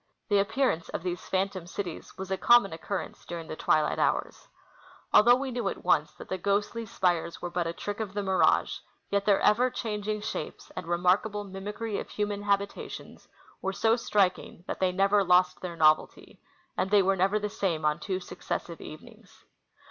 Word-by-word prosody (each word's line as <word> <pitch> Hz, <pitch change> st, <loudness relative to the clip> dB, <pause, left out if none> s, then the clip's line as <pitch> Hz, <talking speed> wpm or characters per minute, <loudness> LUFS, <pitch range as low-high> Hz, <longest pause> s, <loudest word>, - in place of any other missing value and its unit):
The 205 Hz, -1 st, +4 dB
appearance 220 Hz, -4 st, 0 dB
of -, -, -4 dB
these 180 Hz, -1 st, -4 dB
phantom 190 Hz, -2 st, -1 dB
cities 175 Hz, -2 st, -6 dB
was 190 Hz, 0 st, -6 dB
a -, -, +2 dB
common 240 Hz, -6 st, +5 dB
occurrence 190 Hz, +4 st, -5 dB
during 170 Hz, -1 st, -6 dB
the -, -, -5 dB
twilight 155 Hz, -1 st, +1 dB
hours. -, -, -1 dB, 0.7 s
Although 240 Hz, +3 st, +7 dB
we 265 Hz, +1 st, -3 dB
knew 245 Hz, 0 st, -1 dB
at -, -, -7 dB
once -, -, +2 dB
that -, -, -11 dB
the 185 Hz, -, -3 dB
ghostly 205 Hz, +4 st, -1 dB
spires 175 Hz, -7 st, 0 dB
Avere 175 Hz, -1 st, -6 dB
but 175 Hz, -1 st, 0 dB
a 165 Hz, -, -3 dB
trick 205 Hz, +4 st, -5 dB
of 205 Hz, -3 st, -4 dB
the 205 Hz, -, -1 dB
mirage, 190 Hz, -1 st, +2 dB, 0.3 s
yet 200 Hz, 0 st, +1 dB
their 200 Hz, -2 st, +4 dB
ever 240 Hz, +5 st, +4 dB
changing 215 Hz, -3 st, -3 dB
shapes 215 Hz, -, -6 dB
and 185 Hz, -, -6 dB
remarkable 185 Hz, +4 st, +1 dB
mimicry 205 Hz, +2 st, -5 dB
of -, -, -7 dB
human 205 Hz, -1 st, -2 dB
habitations 200 Hz, 0 st, -3 dB, 0.4 s
wer^ 190 Hz, 0 st, -2 dB
so 225 Hz, 0 st, +3 dB
striking 195 Hz, -6 st, 0 dB
that -, -, -5 dB
they 185 Hz, -1 st, +2 dB
never 195 Hz, +2 st, +3 dB
lost 180 Hz, 0 st, +3 dB
their 180 Hz, -2 st, -5 dB
novelty; 155 Hz, -1 st, +2 dB, 0.3 s
and 190 Hz, -, 0 dB
they 205 Hz, -1 st, +5 dB
were 195 Hz, +1 st, +2 dB
never 190 Hz, +3 st, +2 dB
the 210 Hz, 0 st, -2 dB
same 190 Hz, -7 st, -2 dB
on 150 Hz, +1 st, +2 dB
two 185 Hz, 0 st, -2 dB
successive 170 Hz, -2 st, -5 dB
even 155 Hz, -, -10 dB
ings. -, -, -20 dB
195 Hz, 185 wpm, -28 LUFS, 180-210 Hz, 0.7 s, Although